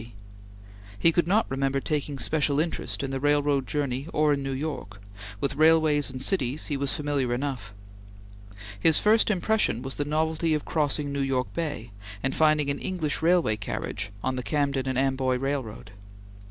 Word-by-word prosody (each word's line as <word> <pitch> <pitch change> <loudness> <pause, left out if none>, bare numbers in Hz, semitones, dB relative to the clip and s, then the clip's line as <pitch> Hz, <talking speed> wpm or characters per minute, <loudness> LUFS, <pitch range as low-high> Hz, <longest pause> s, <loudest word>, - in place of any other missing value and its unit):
He 165 - +4
could 170 0 +1
not 210 +5 +3
remember 135 +1 -1
taking 145 0 -3
special 145 +3 +1
interest 160 -2 -2
in 135 - -3
the 135 - -2
railroad 145 -1 +1
journey 140 -1 -2
or 150 -1 +3
in 140 - -2
New 135 0 -3
York; 135 -8 -5 0.4
with 140 - -1
railways 155 -2 +4
and 130 0 -6
cities 135 -2 +1
he 145 - -2
was 140 0 +1
familiar 140 -5 -1
enough. 125 -7 -4 1.1
His 160 +8 +6
first 220 +2 +4
impression 210 - +1
was 135 0 -3
the 145 - -2
novelty 160 +1 0
of 150 - -4
crossing 145 -2 0
New 140 - -1
York 130 -2 -1
Bay 150 -9 -4 0.3
and 135 +1 0
finding 155 -2 +3
an 140 - -4
English 170 -7 -2
railway 165 -10 +3
carriage 105 0 -4
on 130 0 -1
the - - -2
Camden 140 -1 -1
and 130 -1 -1
Amboy 130 -1 +1
Railroad. 130 -6 -4
140 Hz, 165 wpm, -26 LUFS, 130-155 Hz, 1.1 s, His